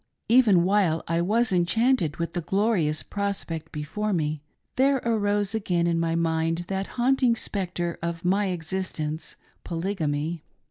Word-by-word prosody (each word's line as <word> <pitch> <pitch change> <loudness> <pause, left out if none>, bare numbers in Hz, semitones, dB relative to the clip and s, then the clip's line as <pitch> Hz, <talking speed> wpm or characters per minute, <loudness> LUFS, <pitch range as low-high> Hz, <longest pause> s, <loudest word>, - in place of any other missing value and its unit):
Even 220 -8 +5
while 185 -4 +2
I 165 +1 +1
was 220 +6 +2
enchanted 180 - +2
with 170 -1 -3
the 175 - -2
glorious 185 -4 +1
prospect 200 -6 -3
before 200 +8 -3
me, 155 -3 -1 0.3
there 270 +1 +4
arose 205 -2 +1
again 180 -6 0
in 170 -1 +1
my 165 0 0
mind 165 +1 0
that 195 0 -2
haunt 265 +3 +2
ing 240 -2 +4
spectre 175 -5 -3
of 170 0 -4
my 195 +3 +2
existence 165 -3 -4
— - - -37
Polygamy. 165 -3 -2
180 Hz, 145 wpm, -26 LUFS, 165-205 Hz, 0.3 s, Even